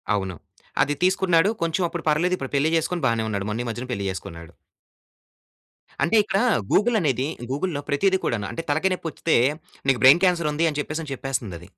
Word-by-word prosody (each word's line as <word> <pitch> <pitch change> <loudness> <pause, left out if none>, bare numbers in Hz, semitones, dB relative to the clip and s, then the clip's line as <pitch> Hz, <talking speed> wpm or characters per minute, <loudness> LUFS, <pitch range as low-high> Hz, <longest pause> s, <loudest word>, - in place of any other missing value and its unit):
అవును. 95 -2 -3 0.5
అది 145 +2 -1
తీసుకున్నాడు 185 -1 +3
కొంచెం 170 +2 0
అప్పుడు 170 -2 -6
పర్లేదు. 175 +5 +2
ఇప్పుడు 135 +1 -7
పెళ్లి 145 +3 +2
చేసుకొని 165 0 -2
బానే 115 -1 0
ఉన్నాడు. 100 -1 -3
మొన్న 115 +3 -2
ఈ 120 - -6
మధ్యనే 120 +3 -5
పెళ్లి 100 -4 -3
చేసుకున్నాడు. 85 -3 -8 1.5
అంటే, 170 +8 +2
ఇక్కడ 195 -1 0 0.3
గూగుల్ 225 +2 +3
అనేది 135 -3 0 0.2
గూగుల్‌లో 145 0 -2
ప్రతీది 190 +6 +2
కూడాను 105 -4 -1
అంటే, 165 - -5
తలకాయ 160 +6 +1
నొప్పి 170 -2 -4
వస్తే 165 - +1 0.5
నీకు 125 -5 +2
బ్రైన్ 140 +7 +8
క్యాన్సర్ 170 -4 +2
ఉంది 165 +2 +1
అని 150 - -4
చెప్పేసి 155 0 -5
చెప్పేస్తుంది 120 -9 -4
అది. 90 - -14
145 Hz, 180 wpm, -23 LUFS, 120-170 Hz, 1.5 s, బ్రైన్